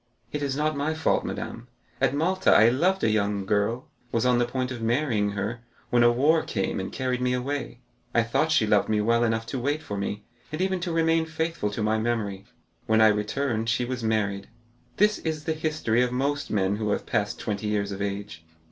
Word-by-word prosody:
"It 150 - -3
is 140 -2 -1
not 155 +1 0
my 145 +3 -1
fault, 160 - +1
madame. 115 +1 -6 0.3
At 135 0 +2
Malta, 185 +5 +2
I 110 +2 +7
loved 180 +10 +1
a - - +4
young 100 -2 0
girl, 105 +5 0 0.2
was 115 0 +1
on 125 -1 +4
the 120 - +3
point 130 +1 -2
of 120 -3 -5
marrying 115 -4 +1
her, 105 +4 -3 0.3
when 120 - +4
war 155 +5 +4
came 95 -2 -2
and 95 - -4
carried 130 -1 -2
me 125 0 +1
away. 125 -1 -3 0.3
I 120 -1 +3
thought 135 +7 0
she 145 -8 +4
loved 105 -1 +2
me 110 -1 +2
well 115 +3 +2
enough 115 -1 0
to 130 +3 -4
wait 145 +5 -1
for 105 -8 -5
me, 100 +1 -3 0.3
and 155 - -4
even 190 0 0
to 175 0 -3
remain 165 0 +2
faithful 160 -7 -2
to 105 +1 -3
my 110 +1 +1
memory. 105 -4 -2 0.4
When 110 0 +3
I 110 0 +7
returned 110 +2 -1
she 120 +1 +1
was 125 -1 -4
married. 100 -3 -1 0.5
This 210 +1 +3
is 155 -2 -3
the 160 - -1
history 155 -7 0
of 125 0 +1
most 140 +3 -1
men 100 -1 +1
who 105 -1 -2
have 105 - -1
passed 105 0 -1
twenty 105 -1 -3
years 100 -1 -1
of 100 0 -5
age. 100 -5 -4
120 Hz, 210 wpm, -26 LUFS, 105-145 Hz, 0.5 s, I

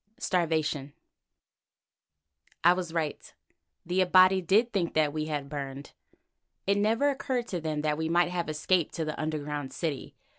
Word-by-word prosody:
STARVATION 155 -5 -1 1.7
I 175 +1 +7
was 180 -2 -4
right. 160 -3 -3 0.5
The 180 +2 +1
Abati 185 +1 +5
did 210 +7 +2
think 180 -4 -1
that 150 -2 +2
we 155 0 -2
had 150 -2 -2
been 140 - -15
burned. 140 -1 -6 0.7
It 200 +1 +2
never 225 +7 +2
occurred 255 -3 -2
to 175 -3 -3
them 155 -1 -2
that 150 0 -1
we 160 0 -1
might 175 +1 +3
have 175 -2 -2
escaped 160 +2 0
to 165 - -2
the 155 - -4
underground 150 -3 -3
city. 155 -6 -4
165 Hz, 155 wpm, -28 LUFS, 150-185 Hz, 1.7 s, I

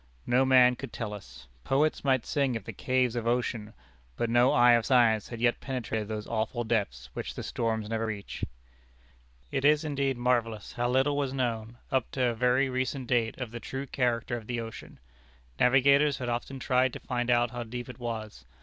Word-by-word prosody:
No 125 +2 +3
man 125 -1 +6
could 135 +2 -8
tell 110 -3 -4
us. 65 -10 -11 0.2
Poets 150 - +1
might 130 -4 +2
sing 140 -4 0
of 115 - -4
the 115 - -7
caves 130 +1 0
of 115 -1 -2
ocean, 120 -3 -1 0.4
but 115 -1 -1
no 120 +2 +5
eye 120 0 +6
of 120 -1 +4
science 115 -5 +4
had 120 - -7
yet 120 0 +2
penetrated 115 -5 -3
those 105 -1 -4
awful 115 +1 -2
depths, 65 - -2
which - - -5
the - - -5
storms 110 -2 -2
never 115 0 -2
reach. 105 -2 -6 1.1
It 135 - -1
is 150 +1 +4
indeed 140 -3 -1
marvellous 120 -3 0
how 120 0 -1
little 135 +3 +2
was 140 -2 -1
known, 120 -3 -2
up 130 -3 +1
to 130 - 0
a - - -1
very 125 +3 +2
recent 130 +1 -2
date, 120 -3 0
of 125 -4 -5
the 120 - -6
true 135 +3 -5
character 120 -2 -1
of 115 -2 -7
the 120 -1 -2
ocean. 115 -1 -8 0.6
Navigators 140 +3 +4
had 125 -1 -4
often 120 +3 -3
tried 130 -1 +1
to - - -6
find 120 -1 -2
out 120 -1 +3
how 120 -1 -5
deep 120 +1 -6
it 125 - -10
was. 110 - -5
120 Hz, 195 wpm, -29 LUFS, 115-130 Hz, 1.1 s, man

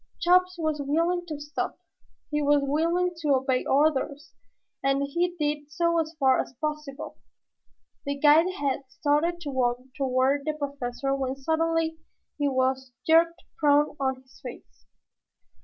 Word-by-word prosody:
Chops 365 +1 +3
was 310 -3 -1
willing 335 +5 0
to 305 -3 -5
stop. 295 +1 -4 0.5
He 295 0 0
was 290 0 +3
willing 335 +5 +1
to 300 -4 +2
obey 260 -1 0
orders, 290 +1 +1 0.5
and 275 +1 +2
he 345 +5 -1
did 295 -1 -2
so 335 +1 +1
as 320 0 -3
far 265 -2 +4
as 260 - -10
possible. 300 -2 -5 0.9
The 280 0 -1
guide 310 +5 +5
had 275 -1 -2
started 300 +5 0
to 290 -4 -4
walk 245 -2 +1 0.2
toward 270 0 +1
the 310 - 0
Professor 275 -3 -3
when 265 -1 -2
suddenly 320 +3 0 0.4
he 290 - +2
was 260 0 0
jerked 335 +2 +3 0.2
prone 295 -1 +3
on 265 -1 -1
his 260 - -21
face. 155 - -11
290 Hz, 140 wpm, -26 LUFS, 270-325 Hz, 0.9 s, guide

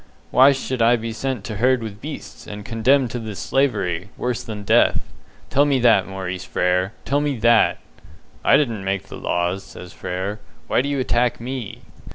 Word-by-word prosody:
Why 135 +2 +7
should 130 -2 -2
I 115 +2 +5
be 115 -1 -4
sent 130 +2 -3
to 110 -3 -5
herd 125 +1 +2
with 105 -1 -7
beasts, 150 +1 -8
and 105 0 -8
condemned 125 +2 +2
to 120 - -3
this 110 -3 -6
slavery, 95 - 0
worse 125 -2 -2
than 105 -2 -7
death? - - +4 0.5
Tell 140 - +4
me 145 -2 +2
that, 110 -5 +4
Maurice 95 -2 -5
Frere 90 +3 0
tell 140 +2 +1
me 145 -3 -1
that!" 115 +1 +4 0.7
"I - - +6
didn't 115 -9 -1
make 95 0 -2
the - - -8
laws," 90 +2 -1
says 90 - -11
Frere, 95 +4 -4 0.3
"why - - +2
do 140 - -3
you 140 - -1
attack 125 -1 +1
me?" 125 -2 -6
115 Hz, 185 wpm, -22 LUFS, 100-130 Hz, 0.7 s, Why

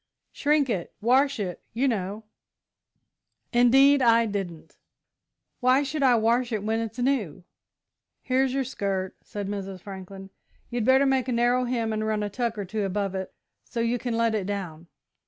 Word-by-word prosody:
"Shrink 295 -1 +2
it. 190 -8 -3
Wash 265 +4 +3
it, 180 -4 -4
you 255 +5 +1
know." 210 -2 -2 1.3
"Indeed 270 +4 +5
I 230 -1 +5
didn't. 195 -6 -5 0.8
Why 255 +2 +4
should 285 +2 -3
I 255 -3 +5
wash 235 +2 +2
it 215 -3 -2
when 220 +1 0
it's 225 +1 -5
new?" 245 - -1 0.8
"Here's 260 0 +1
your 270 +1 0
skirt," 195 -6 -3
said 205 -1 -6
Mrs. 195 -2 -5
Franklin. 195 0 -9 0.4
"You'd 240 -2 -1
better 265 +2 +5
make 265 -1 +1
a - - -1
narrow 245 +1 +2
hem 230 -3 -1
and 215 0 -2
run 215 -1 -1
a 205 - -3
tuck 235 0 -2
or 205 - -3
two 210 +3 -3
above 195 0 -2
it 190 -1 -4 0.3
so 240 - -6
you 235 +1 0
can 235 -2 -2
let 230 -1 +2
it 200 -3 -1
down. 175 -5 -5
225 Hz, 170 wpm, -26 LUFS, 200-255 Hz, 1.3 s, Indeed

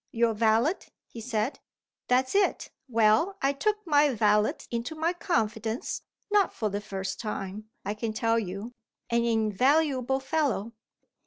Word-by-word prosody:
"Your 230 -1 +2
valet," 225 - +2 0.3
he 230 - -10
said. 225 +2 -2 0.5
"That's 255 +1 +2
it! 400 0 +1 0.2
Well, 230 - +3
I 275 +1 +1
took 420 +8 -1
my 295 -3 +4
valet 210 -1 +3 0.2
into 235 +6 -3
my 325 +3 0
confidence 225 - -2 0.3
not 410 -2 +4
for 215 - -1
the 205 +1 -3
first 190 -1 -5
time, 210 -1 -5 0.2
I 205 - -1
can 220 +1 -3
tell 225 +1 +1
you: 200 +3 -5 0.4
an 235 0 +2
invaluable 255 +5 +2
fellow. 270 -7 -1
230 Hz, 140 wpm, -28 LUFS, 215-285 Hz, 0.5 s, my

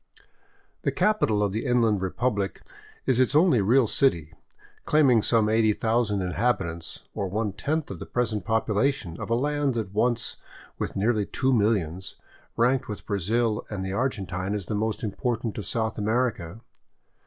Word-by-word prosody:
The - - 0
capital 110 - +2
of 100 - 0
the 110 +3 -2
Inland 115 -6 +2
Republic 100 0 -2 0.4
is 130 -2 +2
its 130 +2 +2
only 155 - +5
real 120 +6 +4
city, 85 - +1 0.5
claiming 135 -7 +4
some 110 0 +3
eighty 110 0 +3
thousand 110 -3 0
inhabitants, 90 -4 -2
or 100 - -2
one 105 +1 -2
tenth 155 +1 -1
the - - -8
present 110 -5 -1
population 110 - 0
of - - -5
a 115 - +2
land 145 0 0
that 105 -4 -3
once, 115 +2 0 0.4
with - - -3
nearly 105 0 +1
two 130 0 0
millions, 95 -6 0 0.4
ranked 130 +2 +2
with 105 - -7
Brazil 105 +3 0
and 95 -3 -4
the 95 - -3
Argentine 100 -5 -2
as 100 -3 -4
the 105 - -4
most 110 +3 -2
important 115 +1 -2
of 100 - -6
South 110 -1 -2
America. 110 -4 -1
110 Hz, 155 wpm, -26 LUFS, 100-125 Hz, 0.5 s, only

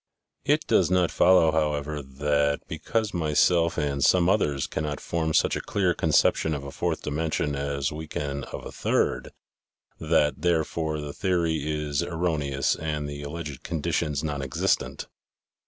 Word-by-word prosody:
It - - +2
does - - +3
not 90 -2 +2
follow, 85 -3 +5
however, 75 -1 -1
that 70 +1 0
because 105 +7 -2
myself 85 +1 +2
and 70 -2 0
some 90 -1 +4
others 75 -9 +1
cannot 75 -1 -3
form 80 -1 -2
such - - +3
a - - -2
clear 95 -3 0
conception 80 0 +2
of 70 - -5
a 70 - -7
fourth 85 +1 -2
dimension 75 -1 -1
as 70 0 -2
we 80 +1 -6
can 70 -1 -4
of - - -8
the - - -7
third, - - 0 0.7
that, 75 0 +1
therefore, 80 -2 0
the 75 -1 -6
theory 85 -4 0
is 75 -1 -1
erroneous 80 -5 0
and 75 -2 -3
the 70 0 -6
alleged 75 -2 -6
conditions 75 -2 -1
non 75 -2 -2
existent. 65 -1 -1
75 Hz, 150 wpm, -26 LUFS, 70-85 Hz, 0.7 s, follow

